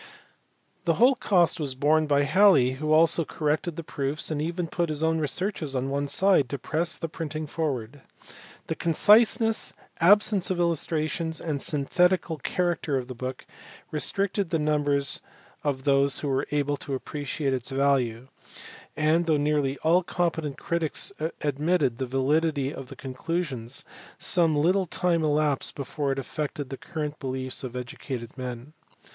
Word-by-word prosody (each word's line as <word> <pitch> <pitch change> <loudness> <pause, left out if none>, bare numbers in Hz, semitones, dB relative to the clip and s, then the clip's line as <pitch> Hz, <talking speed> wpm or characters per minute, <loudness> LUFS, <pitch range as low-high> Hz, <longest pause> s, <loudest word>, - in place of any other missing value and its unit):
The 165 -2 +2
whole 245 - +5
cost 185 -9 +2
was 140 -4 -2
borne 155 +3 +2
by 145 -1 +3
Halley 180 -6 +5
who 155 +4 -3
also 165 +1 +5
corrected 155 +2 -2
the 170 - -6
proofs 145 +1 -3
and 150 -1 -1
even 170 +2 -2
put 170 +1 -1
his 155 0 -1
own 160 0 +2
researches 155 -2 -2
on 130 +1 -1
one 140 +1 -1
side 185 -5 +3
to 140 - -3
press 160 +6 -1
the 165 - -4
printing 155 -1 -5
forward. 140 -4 -3 0.6
The - - -2
conciseness, 220 +6 +3 0.3
absence 205 +1 +4
of 185 -2 -1
illustrations, 160 -1 -1
and 150 -4 -3
synthetical 170 +3 +1
character 165 -2 -1
of 130 -1 -5
the - - -4
book 130 +1 -6 0.5
restricted 195 +5 0
the 165 - +1
numbers 145 -2 +1 0.4
of 135 -3 -1
those 140 -1 +3
who 145 - -2
were 135 0 0
able 145 -1 0
to 140 -1 -4
appreciate 145 +1 -3
its 125 -2 -3
value; 135 -3 +1 0.7
and, 160 +2 +2
though 155 -2 +3
nearly 145 -2 0
all 170 +3 +4
competent 160 -4 -2
critics 170 +1 -2 0.3
admitted 145 -3 0
the 130 - -2
validity 140 +2 +1
of 135 - -8
the - - -10
conclusions, 135 -2 -4 0.3
some 165 -3 +3
little 180 +5 +2
time 170 -1 +1
elapsed 150 -2 +1
before 140 0 -3
it 135 - -2
affected 145 0 -4
the - - -3
current 150 -1 -5
beliefs 130 -1 -4
of 125 -1 -6
educated 125 -1 -6
men. 125 +2 -7
150 Hz, 150 wpm, -26 LUFS, 135-170 Hz, 0.7 s, whole